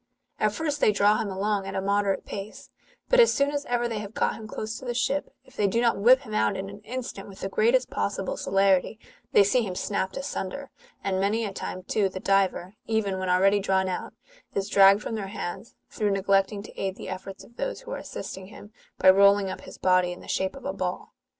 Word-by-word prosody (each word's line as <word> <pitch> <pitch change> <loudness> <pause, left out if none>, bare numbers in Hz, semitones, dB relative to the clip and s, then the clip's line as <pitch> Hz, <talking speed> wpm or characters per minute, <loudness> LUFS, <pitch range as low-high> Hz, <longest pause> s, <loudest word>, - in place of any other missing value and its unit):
At - - +2
first 295 -3 -2
they - - +5
draw 205 +1 +3
him 210 - -2
along 195 +1 -1
at 195 - -5
a - - 0
moderate 200 0 0
pace, 200 +1 -8 0.4
bat - - +5
as 465 - +7
soon 280 +1 +1
as 285 0 -3
ever 240 0 0
they 225 -2 -3
have 210 +1 -8
got - - +1
him 220 - -9
close 215 +1 -5
to 260 - -11
the 240 -1 -3
ship, 275 +4 0 0.2
if 260 - -20
they 205 - +2
do 230 +4 +1
not 235 -1 +3
whip 250 +6 +6
him 215 -6 -9
out 215 - +1
in 195 +1 -5
an 200 - -11
instant, 225 -2 -6
with 195 - -12
the 195 - -3
greatest 235 +6 +2
possible 195 -2 -2
celerity, 195 +1 +2 0.3
they 205 - +6
see 245 +6 +2
him 190 -5 -4
snapped 190 -1 -2
asunder; 275 -1 -5 0.3
and 190 -1 0
many 215 +4 +1
a 200 - -5
time, 185 -1 -5
too, 195 +1 +1
the 185 - -6
diver, 195 -1 +1
even 205 -4 0
when 185 -1 -2
already 195 +3 +4
drawn 190 -1 +1
out, 185 - -4 0.4
is 195 0 -1
dragged 200 +1 +6
from - - -4
their 210 -3 -3
hands, 195 +3 -6 0.2
through 210 -2 0
neglecting 195 +1 +1
to - - -12
aid 190 -1 -2
the - - -9
efforts 190 +1 -7
of 235 - -19
those - - -3
who - - -10
are - - -3
assisting 190 0 -7
him, 210 +1 -13 0.2
by - - +2
rolling 200 0 +5
up - - -7
his - - -11
body 185 -1 +3
in 180 - -8
the - - -13
shape 190 0 -1
of 270 - -11
a - - -2
ball. - - -4
200 Hz, 235 wpm, -26 LUFS, 195-230 Hz, 0.4 s, as